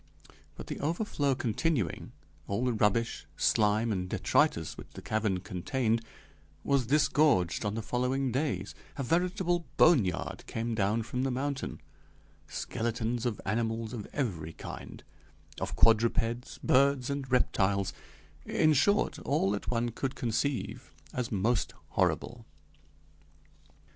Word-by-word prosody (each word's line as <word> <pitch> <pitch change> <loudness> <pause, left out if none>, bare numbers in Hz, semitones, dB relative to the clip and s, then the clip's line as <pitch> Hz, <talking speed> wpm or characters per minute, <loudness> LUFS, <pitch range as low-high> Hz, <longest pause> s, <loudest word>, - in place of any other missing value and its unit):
But - - -8
the - - -5
overflow 150 -3 0
continuing, 125 - -1 0.4
all 100 +6 -1
the 125 - +2
rubbish, 110 +2 +1
slime, 110 +1 +3
and 90 -2 -2
detritus - - +1
which - - -10
the - - -7
cavern 105 -4 0
contained 115 +5 -1 0.6
was 135 -4 +2
disgorged 140 - +3
on 105 0 -1
the 115 - -3
following 125 +3 0
days; 140 +4 -1 0.2
a 140 - -1
veritable 175 - +1
bone 160 -9 +7
yard 90 -2 -3
came 115 +1 -2
down 110 +1 +1
from 125 +3 -3
the 135 - +1
mountain: 135 +2 -3 0.7
skeletons 115 +1 -2
of 110 -3 -3
animals 115 +1 -1
of 110 -4 -5
every 85 - -2
kind - - -9 0.6
of - - -3
quadrupeds, 115 +1 +2
birds, 140 0 +3
and 140 -2 -4
reptiles 100 -6 +2 0.5
in 155 -1 +3
short, 200 +9 +2
all 140 -9 +1
that 105 - -3
one 120 0 +1
could 130 +3 -3
conceive 125 +3 -2 0.2
as 125 -2 -2
most 110 +4 +1
horrible. - - 0
120 Hz, 125 wpm, -30 LUFS, 110-135 Hz, 0.7 s, bone